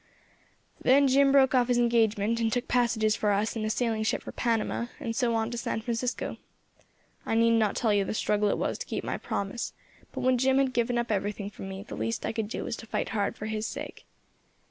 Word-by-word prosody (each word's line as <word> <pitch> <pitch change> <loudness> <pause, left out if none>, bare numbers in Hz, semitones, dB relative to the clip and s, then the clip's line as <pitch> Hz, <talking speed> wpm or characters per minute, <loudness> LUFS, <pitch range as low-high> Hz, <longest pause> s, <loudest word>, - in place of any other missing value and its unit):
"Then 275 +2 +5
Jim 275 +1 +4
broke 270 -1 +5
off 250 -2 +4
his 245 -1 +2
engagement, 230 -2 +2
and 225 -1 +1
took 245 +1 -1
passages 225 -3 +2
for 210 - 0
us 205 +3 0
in 225 - -2
a 215 - -1
sailing 225 -1 0
ship 220 - 0
for - - -7
Panama, 235 0 -1
and 230 -1 -3
so 240 -2 +1
on 225 +1 0
to 240 - -3
San 225 - -2
Francisco. 235 +2 -2 0.9
I - - -1
need 230 0 +4
not 220 -3 +2
tell 220 -3 +2
you 200 -1 +3
the 195 - -3
struggle 210 -1 +1
it - - 0
was - - -2
to - - -6
keep - - -3
to - - -8
my - - -2
promise; 200 +4 -3 0.4
but - - -5
when 255 -1 +3
Jim 265 +1 +3
had 270 -2 +2
given 240 0 +1
up 235 -1 -1
everything 205 0 -2
for - - -13
me, 195 0 -6
the - - -10
least 230 - -2
I - - -2
could 220 -2 -2
do 220 - -4
was 240 - -3
to 225 - -10
fight - - -2
hard 205 -2 -1
for 215 - -6
his 220 0 -2
sake. - - -7
230 Hz, 235 wpm, -28 LUFS, 215-245 Hz, 0.9 s, Then